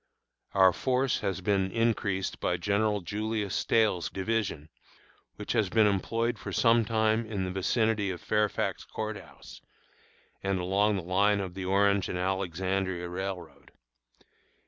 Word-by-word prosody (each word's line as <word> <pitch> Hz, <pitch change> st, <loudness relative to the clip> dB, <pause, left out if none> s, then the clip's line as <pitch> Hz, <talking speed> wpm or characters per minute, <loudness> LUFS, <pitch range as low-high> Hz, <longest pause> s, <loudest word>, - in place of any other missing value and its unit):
Our 95 Hz, -2 st, +6 dB
force 130 Hz, +4 st, 0 dB
has 95 Hz, -3 st, -2 dB
been 95 Hz, 0 st, +1 dB
increased 105 Hz, -4 st, 0 dB
by -, -, 0 dB
General 105 Hz, 0 st, +1 dB
Julius 105 Hz, +2 st, -3 dB
Stahel's 105 Hz, -6 st, +1 dB
division, 95 Hz, -6 st, -2 dB, 0.7 s
which -, -, -5 dB
has 105 Hz, -4 st, +1 dB
been 110 Hz, +2 st, +4 dB
employed 115 Hz, +3 st, 0 dB
for -, -, -6 dB
some 115 Hz, -1 st, +4 dB
time 110 Hz, +1 st, +1 dB
in 105 Hz, -4 st, -3 dB
the 90 Hz, -, -3 dB
vicinity 105 Hz, +2 st, +1 dB
of 90 Hz, -2 st, -4 dB
Fairfax 105 Hz, +2 st, 0 dB
Court 110 Hz, -1 st, -5 dB
House, 95 Hz, -, -14 dB, 0.8 s
and 95 Hz, -1 st, -1 dB
along 100 Hz, +4 st, +2 dB
the 95 Hz, -, -3 dB
line 100 Hz, +4 st, +2 dB
of 95 Hz, -2 st, -4 dB
the 95 Hz, 0 st, -5 dB
Orange 100 Hz, +1 st, +2 dB
and 90 Hz, -, -3 dB
Alexandria 95 Hz, 0 st, -1 dB
Railroad. 95 Hz, 0 st, -6 dB
100 Hz, 140 wpm, -29 LUFS, 95-110 Hz, 0.8 s, Our